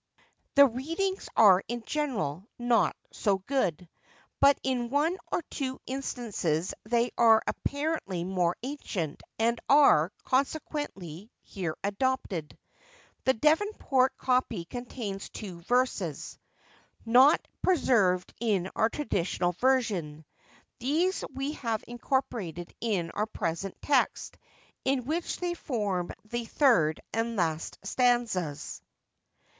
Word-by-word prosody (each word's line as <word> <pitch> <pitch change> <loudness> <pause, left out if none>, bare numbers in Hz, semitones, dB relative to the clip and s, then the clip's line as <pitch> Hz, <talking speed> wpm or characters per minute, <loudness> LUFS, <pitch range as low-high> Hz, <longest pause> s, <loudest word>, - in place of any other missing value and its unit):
The 280 0 +9
readings 330 - -2
are 195 -4 +7
in 240 0 -4
general 225 - -2
not 240 -1 +2 0.2
so 200 -3 +1
good; 185 - -1 0.5
but 280 0 +6
in 250 -3 -1
one 295 +6 +2 0.2
or - - 0
two 260 -2 -3
instances 220 - -2
they 235 +2 +1
are 225 -1 +6
apparently 285 - -2
more 180 -1 0
ancient, 210 - -4 0.2
and 230 +1 +1
are, 270 - +6
consequently, 255 - -2
here 175 -6 -4
adopted. 200 - -2 0.7
The 260 - +4
Devonport 300 - +2
copy 250 -9 0
contains 230 -3 -6
two 185 -6 -8
verses, 215 - -1 0.7
not 255 +7 +5
preserved 215 - +2
in 200 -5 0
our 220 - +3
traditional 185 - -1
version. 180 - 0 0.5
These 325 +9 +1
we 270 +2 -3
have 230 -7 -3
incorporated 235 - -3
in 195 -7 -1
our 210 +1 -1
present 180 -2 -3
text, 275 -3 +1 0.4
in 265 -2 0
which 330 +5 -2
they 355 -1 -2
form 205 - -2 0.2
the 235 +2 -3
third 195 - +3
and 230 +1 -1
last 160 -4 -1
stanzas. 220 - 0
235 Hz, 105 wpm, -29 LUFS, 185-265 Hz, 0.7 s, The